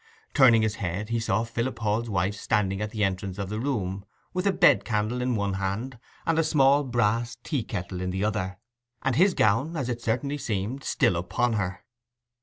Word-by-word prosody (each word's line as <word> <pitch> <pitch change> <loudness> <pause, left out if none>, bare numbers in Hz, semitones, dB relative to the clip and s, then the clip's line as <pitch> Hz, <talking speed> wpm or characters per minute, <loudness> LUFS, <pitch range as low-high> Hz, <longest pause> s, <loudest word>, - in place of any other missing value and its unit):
Turning 120 -6 +6
his 110 -1 -1
head 100 +3 -3
he 115 0 0
saw 115 0 0
Philip 115 +2 -3
Hall's 115 +1 -1
wife 95 0 0
standing 100 -1 0
at 105 - -2
the 105 -1 -2
entrance 95 0 -2
of 100 -2 -4
the 105 +1 -3
room 100 -8 -2 0.3
with 180 +2 0
a - - +5
bed 180 -1 +5
candle 110 +2 -1
in 125 -1 0
one 100 -2 -1
hand, 100 +6 -3 0.3
a 165 0 +2
small 145 -2 +4
brass 120 -2 0
tea 140 -8 -1
kettle 90 -3 -5
in 90 - -2
the 95 +2 -2
other, 100 -3 -2 0.5
and 130 -2 +1
his 185 +6 +4
gown, 135 +11 +2
as 130 -4 -2
it 120 -1 -3
certainly 140 +6 -1
seemed, 115 +4 -3
still 90 - +2
upon 95 +8 0
her. 95 -4 -3
110 Hz, 195 wpm, -26 LUFS, 100-130 Hz, 0.5 s, Turning